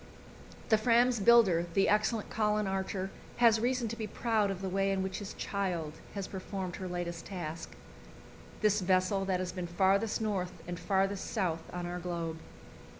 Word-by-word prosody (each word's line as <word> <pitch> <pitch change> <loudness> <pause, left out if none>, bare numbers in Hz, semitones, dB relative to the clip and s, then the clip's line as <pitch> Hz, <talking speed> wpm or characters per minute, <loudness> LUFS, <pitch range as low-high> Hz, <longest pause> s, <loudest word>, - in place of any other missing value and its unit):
The 220 -2 +5
Fram's 240 +1 +4
builder, 195 -6 +5
the 195 - +4
excellent 215 +1 +1
Colin 210 -1 +1
Archer, 190 0 -2 0.3
has 230 -2 +5
reason 245 +1 0
to 230 - -4
be 220 -2 -4
proud 220 -2 +1
of 195 -1 -4
the - - -1
way 195 +1 +1
in 190 -1 0
which 190 0 -3
his 205 -1 -7
"child" 180 -6 -2 0.2
has 195 -2 -3
performed 190 -1 -5
her 185 - -5
latest 175 -1 -4
task 165 -4 -6 0.9
this 210 -1 +3
vessel 185 +1 +2
that 185 -1 0
has 185 -1 -2
been 180 -1 -4
farthest 195 +5 +2
north 195 -5 -1
and 175 0 -4
farthest 195 +2 0
south 175 -7 -1
on 175 0 -4
our 175 +1 -4
globe. 170 -2 -4
195 Hz, 170 wpm, -31 LUFS, 180-210 Hz, 0.9 s, The